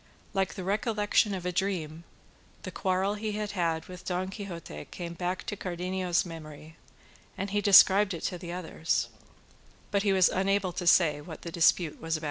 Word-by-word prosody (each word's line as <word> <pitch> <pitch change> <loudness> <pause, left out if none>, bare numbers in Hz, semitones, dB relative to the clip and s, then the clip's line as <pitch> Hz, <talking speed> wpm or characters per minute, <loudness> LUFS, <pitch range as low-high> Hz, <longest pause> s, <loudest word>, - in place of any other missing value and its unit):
Like 190 -4 0
the 190 - -5
recollection 210 0 +1
of 180 -2 -6
a 180 - 0
dream, 170 -4 -2 0.6
the - - -6
quarrel 190 +1 0
he 210 0 -3
had 210 -1 -3
had 165 -4 -1
with 180 0 -10
Don 185 +1 -2
Quixote 170 - -7
came 170 -1 -6
back 180 +1 -3
to 205 - -4
Cardenio's 180 -1 -1
memory, 155 -2 -10 0.6
and 195 +1 -3
he 205 0 +1
described 200 -1 +7
it 165 - -7
to 180 -2 -2
the 170 0 -7
others; 170 -2 -1 0.8
but 200 -1 +2
he 200 -1 +2
was 190 -2 +5
unable 195 -1 0
to 175 - -4
say 155 -4 +5
what 160 0 -10
the 170 - -6
dispute 165 -1 +2
was 165 0 -1
about. - - -8
185 Hz, 180 wpm, -29 LUFS, 170-195 Hz, 0.8 s, described